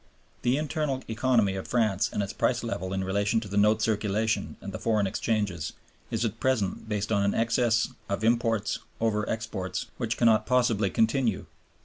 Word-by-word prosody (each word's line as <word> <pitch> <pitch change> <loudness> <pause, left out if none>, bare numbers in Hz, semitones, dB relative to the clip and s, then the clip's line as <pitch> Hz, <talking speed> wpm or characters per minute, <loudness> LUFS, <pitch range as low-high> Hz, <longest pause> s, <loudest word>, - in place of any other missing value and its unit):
The 125 +3 +2
internal 150 -3 -2
economy 110 -3 +2
of 95 - -5
France 110 -4 +1
and 105 - -1
its 100 - -5
price - - +1
level 95 +1 -3
in 95 0 -1
relation 100 +4 +1
to 110 - -7
the 100 - -5
note 105 +1 +4
circulation 110 0 0
and - - -7
the - - -5
foreign 110 -3 +1
exchanges 100 -5 -1 0.4
is 115 +1 0
at 115 0 -3
present 110 -5 0
based 105 0 -2
on 100 -2 +3
an 100 0 +1
excess 115 0 +2 0.2
of 100 +2 -2
imports 115 -2 +1 0.2
over 105 -2 0
exports 110 -5 -3
which 115 -2 -1
cannot 115 -2 +4
possibly 120 -5 +2
continue. 115 -1 +1
110 Hz, 170 wpm, -27 LUFS, 100-115 Hz, 0.4 s, note